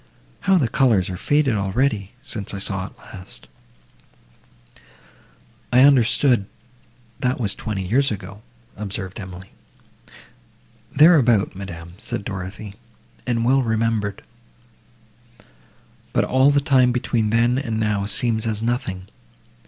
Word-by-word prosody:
How 195 0 +3
the 140 -8 +2
colours 115 -7 +2
are - - -4
faded 145 +6 +1
already!—since 105 0 -2
I - - -4
saw 95 -1 -2
it - - -18
last!" 90 -2 -13 2.2
"I 125 - +5
understood, 130 -4 +4 0.7
that 130 0 0
was 105 -5 0
twenty 105 -4 -4
years 135 +9 +2
ago," 100 0 -7 0.3
observed 100 -2 -5
Emily. 95 -1 -10 1.4
"Thereabout, 135 - +4
madam," 85 -3 -8
said 100 - -5
Dorothée, 100 +1 -6 0.5
"and 115 -2 0
well 135 +2 +3
remembered, 110 -3 -1 1.9
but - - +2
all 130 +2 +3
the 145 0 +3
time 130 -3 +3
between 120 -3 0
then 120 +3 +2
and 115 -6 -3
now 105 -2 0
seems 110 +2 +1
as 110 0 -2
nothing. 105 -6 -2
110 Hz, 115 wpm, -21 LUFS, 100-125 Hz, 2.2 s, I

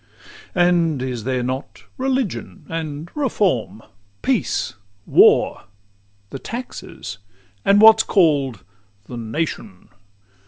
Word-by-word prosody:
VI 180 - +2
And 165 -5 +2
is 125 -4 -4
there 130 -1 -1
not 130 +2 -5
religion, 255 - -2
and 160 0 -5
reform, 180 - 0 0.4
Peace, - - 0 0.3
war, - - +4 0.7
the 135 - -6
taxes, 230 - -7 0.4
and 200 +1 +5
what's 220 0 +8
call'd 145 - +2 0.4
the 125 - -9
"Nation"? 115 - -5
155 Hz, 95 wpm, -21 LUFS, 125-200 Hz, 0.7 s, what's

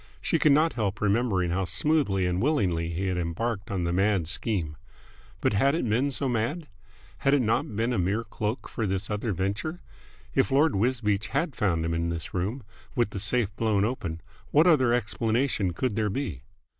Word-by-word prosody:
She - - 0
could 150 - +5
not 155 +3 +4
help 105 -3 -2
remembering 100 -4 +1
how 95 +2 0
smoothly 100 - +1
and 90 +1 0
willingly 95 - +1
he 85 +3 -2
had 90 -1 -1
embarked 100 +5 -2
on 95 -3 -1
the 85 0 0
mad 95 -3 +2
scheme. 85 -5 -2 0.7
But - - +2
had 135 +9 +3
it 165 - -1
been 120 +6 +2
so 140 0 -2
mad? 125 +8 -1 0.5
Had 140 +1 +3
it - - +3
not 110 -1 0
been 115 +3 0
a 115 - 0
mere 100 +6 0
cloak 110 +1 -4
for 110 - -2
this 95 +2 -2
other 105 +2 -1
venture? 100 - -2 0.5
If - - +2
Lord 140 +1 +3
Wisbeach 105 -2 +1
had 145 0 -1
found 85 -7 +1
him 85 - -1
in 85 0 -1
this 85 -1 -5
room, 105 +8 -2 0.3
with 120 -5 +1
the 100 - -4
safe 105 +1 0
blown 105 -3 +1
open, 90 -9 -3 0.3
what 155 +3 +5
other 140 -9 +5
explanation 115 -2 0
could 110 +5 -2
there 110 -1 +1
be? 100 - -3
105 Hz, 190 wpm, -27 LUFS, 95-125 Hz, 0.7 s, could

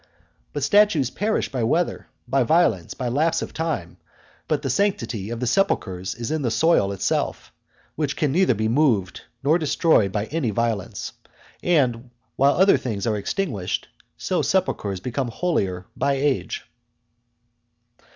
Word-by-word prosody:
But 145 - -3
statues 165 - +4
perish 215 -5 -1
by 130 -3 -1
weather, 165 +10 0 0.2
by 135 +2 +2
violence, 135 - +2
by 125 - -3
lapse 155 +7 +1
of - - -8
time; 145 - -3 0.5
but 150 -1 0
the 135 - -1
sanctity 120 - -1
of 120 0 -4
the 125 - -1
sepulchres 95 - 0
is 120 +4 -4
in 155 -1 -1
the 125 - 0
soil 115 -3 +3
itself, 100 - -2 0.4
which 145 -2 -1
can 150 -3 0
neither 180 -5 +3
be 110 +1 0
moved 115 -7 +1 0.2
nor 155 +5 +3
destroyed 155 - +2
by 105 +1 -1
any 150 -2 -2
violence; 110 -2 -2 0.5
and 130 -8 +1 0.3
while 140 +2 +4
other 190 +2 +5
things 105 -6 -3
are 110 -2 +1
extinguished, 105 - -2 0.3
so - - -1
sepulchres 100 -2 0
become 125 +3 -2
holier 100 - -1
by 140 0 +1
age. 140 0 -1
130 Hz, 145 wpm, -23 LUFS, 110-160 Hz, 0.5 s, other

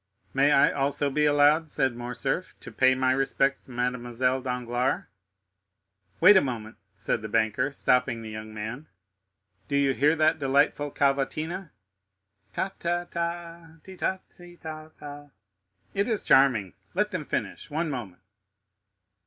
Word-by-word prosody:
"May 140 +2 +4
I 140 - +5
also 140 0 0
be 150 +2 +2
allowed," 145 +2 +4
said 135 -4 0
Morcerf, 120 0 -3
"to - - -9
pay 130 0 +4
my 130 0 +2
respects 135 +1 +1
to - - -14
Mademoiselle 125 +1 -1
Danglars?" 125 0 -1 1.2
"Wait 195 +5 +8
a 190 - +7
moment," 115 -4 -5 0.2
said - - -2
the 110 - -6
banker, 115 +5 +1
stopping 125 -4 +1
the 110 - -7
young 110 0 -7
man; 110 +8 -6 0.8
"do 140 - -2
you 140 -1 +3
hear 150 +4 +3
that 155 +1 +2
delightful 145 +1 +2
cavatina? 155 +6 -1 0.8
Ta, 190 - -2
ta, 175 +1 -1
ta, 170 -1 -5
ti, 190 - -11
ta, 190 +1 -1
ti, 175 -1 -16
ta, 155 -1 -8
ta; 145 0 -10 0.6
it 200 +1 0
is 220 -4 0
charming, 120 -9 +4 0.2
let - - +1
them - - -3
finish—one 160 +3 -3
moment. 105 -9 -6
140 Hz, 140 wpm, -27 LUFS, 125-155 Hz, 1.2 s, Wait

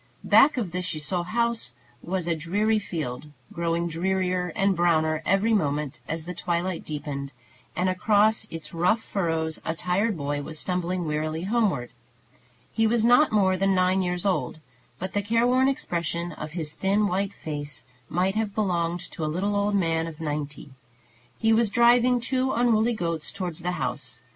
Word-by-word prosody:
Back 280 0 +6
of 210 -8 -2
the 180 +1 -2
Ciseaux 175 0 -2
house 230 - -1 0.3
was 180 -1 -2
a 170 - +1
dreary 205 +7 +1
field, 150 -8 -5 0.3
growing 170 0 0
drearier 180 +1 -1
and 195 0 +2
browner 160 -2 +2
every 195 +5 +3
moment 150 -7 0
as 160 0 -3
the 180 - -5
twilight 175 0 -2
deepened; 145 -2 -5 0.4
and 180 - +1
across 210 +4 +3
its 155 -2 -8
rough 180 +7 +2
furrows 165 -4 -2
a 165 - -2
tired 185 +4 0
boy 145 0 -2
was 155 +2 -7
stumbling 180 0 -2
wearily 155 +1 -2
homeward. 195 - 0 0.8
He 225 -1 +2
was 230 0 +2
not 245 +6 +5
more 195 -3 +3
than 195 +1 +2
nine 185 +1 +3
years 180 0 -2
old, 190 -4 0 0.4
but 185 +4 -5
the 205 - +1
careworn 240 +5 +3
expression 170 - -2
of 155 0 -7
his 160 -3 -3
thin 200 +2 +1
white 195 +1 -1
face 145 -2 -5 0.2
might 185 +3 +1
have 215 -2 -2
belonged 175 -4 0
to 165 - -5
a - - 0
little 195 +6 -1
old 205 0 +1
man 165 -3 +1
of 160 -1 -9
ninety. 150 -2 -4 0.7
He 225 0 +3
was 225 -1 +3
driving 240 +2 +4
two 260 +2 0
unruly 235 -1 +3
goats 165 -5 -3
towards 180 -4 -4
the 180 +1 -1
house. 130 -8 -4
180 Hz, 165 wpm, -26 LUFS, 160-210 Hz, 0.8 s, Back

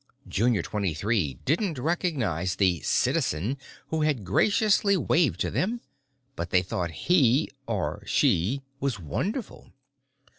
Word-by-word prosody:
Junior 110 -3 +1
Twenty 100 -6 -2
Three 95 - 0
didn't 165 - 0
recognize 125 - -1
the 90 -4 +2
Citizen 90 - 0 0.3
who 160 -1 -1
had 145 -9 0
graciously 200 - +3
waved 165 -2 +2
to - - 0
them, 230 +6 -1 0.6
but 85 - -4
they 90 -1 +3
thought 90 -1 -2
he—or 130 - +1
she?—was 135 - 0
wonderful. 190 - -4
125 Hz, 110 wpm, -27 LUFS, -, 0.6 s, graciously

